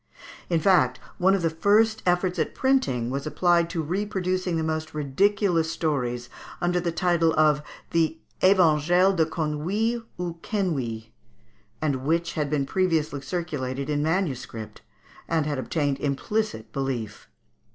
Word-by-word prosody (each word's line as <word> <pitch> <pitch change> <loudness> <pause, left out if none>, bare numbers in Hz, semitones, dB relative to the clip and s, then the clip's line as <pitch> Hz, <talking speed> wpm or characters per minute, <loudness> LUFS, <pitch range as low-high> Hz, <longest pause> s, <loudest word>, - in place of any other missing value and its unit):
In 170 -2 +2
fact, 160 -9 +3 0.2
one 190 +2 +4
of 190 - -2
the 165 - +3
first 215 +6 +3
efforts 180 0 +1
at 155 - -1
printing 135 - +1
was 140 +3 -3
applied 170 +1 +2
to 165 -2 -2
reproducing 185 0 -1
the 160 - -1
most 155 0 -3
ridiculous 165 +3 +1
stories 125 -7 -2 0.3
under 175 0 +1
the 175 -1 -1
title 170 -1 +2
of 150 -1 +4 0.3
the 165 -1 +1 0.2
"Evangile 180 0 +4
des 160 -3 +3
Conuilles 180 +10 -1 0.2
ou 170 -2 -4
Quenouilles," 130 - -2 0.7
and 145 -3 +1
which 165 +4 0
had 150 -2 -1
been 145 -2 0
previously 160 -4 0
circulated 140 -3 -3
in 145 0 0
manuscript, 150 - -2 0.5
and 160 -2 +1
had 145 -3 -2
obtained 145 0 -1
implicit 145 - -2
belief. 125 -6 -4
160 Hz, 135 wpm, -25 LUFS, 145-180 Hz, 0.7 s, one